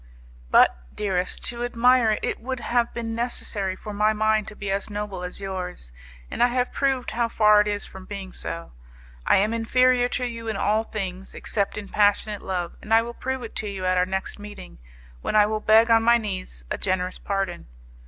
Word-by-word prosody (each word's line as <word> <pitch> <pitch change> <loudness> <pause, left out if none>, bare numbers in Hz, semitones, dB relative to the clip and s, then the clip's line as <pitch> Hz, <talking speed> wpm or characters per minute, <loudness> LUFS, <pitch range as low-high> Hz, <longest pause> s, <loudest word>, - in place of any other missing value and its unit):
But, - - +5 0.2
dearest, 185 -3 -2
to 240 0 -4
admire 245 -1 +4
it - - -4
it - - -2
would 260 +1 -4
have 240 0 0
been 230 -1 -4
necessary 220 -5 -1
for 210 +2 -8
my 210 +1 +3
mind 215 0 +1
to 215 - -9
be 200 -1 -4
as 200 +2 -2
noble 205 -3 -4
as 180 0 -5
yours, 185 - -6 0.4
and - - -3
I 245 - +7
have 250 0 -1
proved 270 -2 0
how 235 0 0
far 210 -2 +5
it 210 - -1
is 205 -1 -2
from 190 0 -11
being 195 -2 -7
so. 165 0 -6 0.6
I - - +6
am 210 +4 +2
inferior 245 +2 +3
to 250 - -1
you 230 -1 -5
in 220 -3 -2
all 215 +2 +2
things, 190 -3 -5
except 200 -2 -2
in 205 -1 -5
passionate 205 0 +2
love, 180 -3 -3
and 220 +1 +2
I 225 - +5
will 235 +1 -6
prove 260 +1 -4
it 230 - -8
to 215 - -2
you 190 -2 -5
at 185 0 +2
our 180 - +2
next 190 +2 -4
meeting, 205 - -10 0.4
when - - -2
I 210 -1 +7
will 215 +1 -1
beg 220 +2 +5
on 225 0 +6
my 235 +1 +5
knees 185 - -5
a - - -2
generous 185 0 -1
pardon. 195 - -3
210 Hz, 210 wpm, -24 LUFS, 195-230 Hz, 0.6 s, I